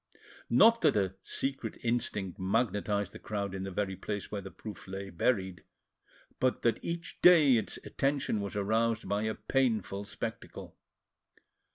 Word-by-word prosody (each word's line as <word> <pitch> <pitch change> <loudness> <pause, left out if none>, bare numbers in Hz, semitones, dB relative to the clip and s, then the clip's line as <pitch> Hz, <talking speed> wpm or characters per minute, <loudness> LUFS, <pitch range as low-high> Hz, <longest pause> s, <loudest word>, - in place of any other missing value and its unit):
Not 230 +1 +6
that - - +4
a 95 -2 +1
secret 135 -2 -3
instinct 110 -6 -1
magnetised 100 -1 0
the - - -10
crowd 100 -2 -3
in 95 - -4
the 95 - -4
very 95 0 -2
place 100 +2 -5
where 100 - -3
the 95 - -8
proof 105 -2 -9
lay 95 0 -6
buried, 95 -2 0 0.8
but 130 0 +1
that 115 - +1
each 170 0 -5
day 155 -7 +7
its 110 - -3
attention 135 -6 0
was 100 -1 -5
aroused 110 +2 +1
by 100 +1 0
a 110 - -1
painful 110 -6 0
spectacle. - - -6
105 Hz, 150 wpm, -31 LUFS, 95-120 Hz, 0.8 s, day